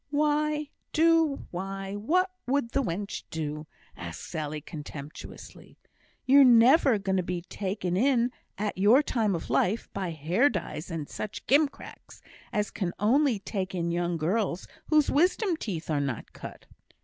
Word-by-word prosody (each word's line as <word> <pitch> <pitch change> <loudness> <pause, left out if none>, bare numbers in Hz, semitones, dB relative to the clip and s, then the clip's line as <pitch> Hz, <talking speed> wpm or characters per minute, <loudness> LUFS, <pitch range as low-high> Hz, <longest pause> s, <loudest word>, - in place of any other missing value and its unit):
"Do 325 -3 +3
why, 195 +2 -5
what 350 - +1 0.2
would 260 -3 0
the 275 - +1
wench 200 -2 -3
do?" 150 -1 -4 0.3
asked 85 -2 -7
Sally, 155 -2 -4
contemptuously. 150 -1 -10 0.5
"Ye're 275 +2 +7
never 250 +1 +6
going 195 -1 -1
to - - +2
be 175 -1 -4
taken 185 -1 -3
in, 245 +2 +2 0.3
at 205 -1 -3
your 225 +9 +6
time 220 -8 0
of 165 - -5
life, 210 +5 +1
by 190 -3 -3
hair 170 - +2
dyes 155 - -5
and 160 -4 -4
such 215 - -6
gimcracks, 285 +2 -1 0.3
as 210 0 -1
can 180 -4 -3
only 255 +3 +3
take 190 -1 -4
in 170 -1 -1
young 175 0 -1
girls 185 +3 -1 0.2
whose 305 -2 +3
wisdom 360 +4 +2
teeth 185 - -5
are 145 -2 +1
not 135 -5 -4
cut." - - -10
200 Hz, 145 wpm, -28 LUFS, 170-260 Hz, 0.5 s, Ye're